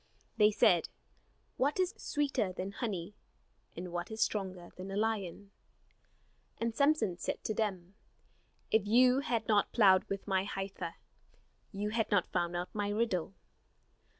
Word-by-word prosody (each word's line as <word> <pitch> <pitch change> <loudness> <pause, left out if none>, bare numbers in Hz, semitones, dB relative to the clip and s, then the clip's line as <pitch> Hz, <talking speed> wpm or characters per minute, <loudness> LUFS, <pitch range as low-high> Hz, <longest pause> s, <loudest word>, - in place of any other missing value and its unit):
They 210 0 +6
said: 175 -5 +3 0.7
"What 285 +7 +1
is 370 +1 +1
sweeter 280 -9 -1
than 185 +2 -5
honey? 205 -4 -4 0.6
And 175 +1 -5
what 175 0 -3
is 220 0 -7
stronger 185 -5 -2
than 185 +1 -7
a 195 - -3
lion?" 205 -3 -2 1.1
And 230 0 -1
Samson 280 - +2
said - - -3
to 215 - -1
them: 195 -4 -2 0.8
"If 215 -2 +3
you 250 +4 +5
had 235 -6 -1
not 210 -2 +3
plowed 190 -5 +5
with 195 0 -4
my 190 -2 +1
heifer, 195 -3 -5 0.8
You 210 +1 -3
had 225 0 0
not 205 -4 +1
found 175 0 0
out 175 +1 -4
my 205 -1 -1
riddle." 205 -4 -1
205 Hz, 145 wpm, -33 LUFS, 185-225 Hz, 1.1 s, They